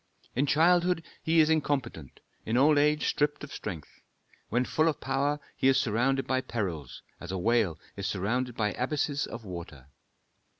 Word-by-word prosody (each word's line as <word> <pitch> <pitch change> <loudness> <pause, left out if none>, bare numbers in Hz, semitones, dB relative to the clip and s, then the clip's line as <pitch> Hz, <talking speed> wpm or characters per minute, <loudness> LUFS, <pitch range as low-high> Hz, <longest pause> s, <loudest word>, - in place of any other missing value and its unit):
In 140 +3 +1
childhood 175 +3 +3 0.2
he 160 0 +4
is 155 0 +3
incompetent, 135 - -2 0.2
in 115 +2 0
old 145 +3 +5
age 150 +1 +2
stripped 150 0 0
of 150 - -8
strength. 85 -8 -7 0.5
When 120 +3 +1
full 155 +4 +1
of 155 - 0
power, 140 +2 0 0.2
he 130 - +1
is 135 0 +5
surrounded 135 +2 +1
by 130 0 0
perils, 90 - -4 0.2
as 85 - -7
a 95 - -2
whale 100 -5 +1 0.2
is 100 -1 -3
surrounded 120 +6 -1
by 105 -2 +1
abysses 145 - -1
of 115 -1 -8
water. 85 -7 -9
130 Hz, 165 wpm, -29 LUFS, 105-150 Hz, 0.5 s, old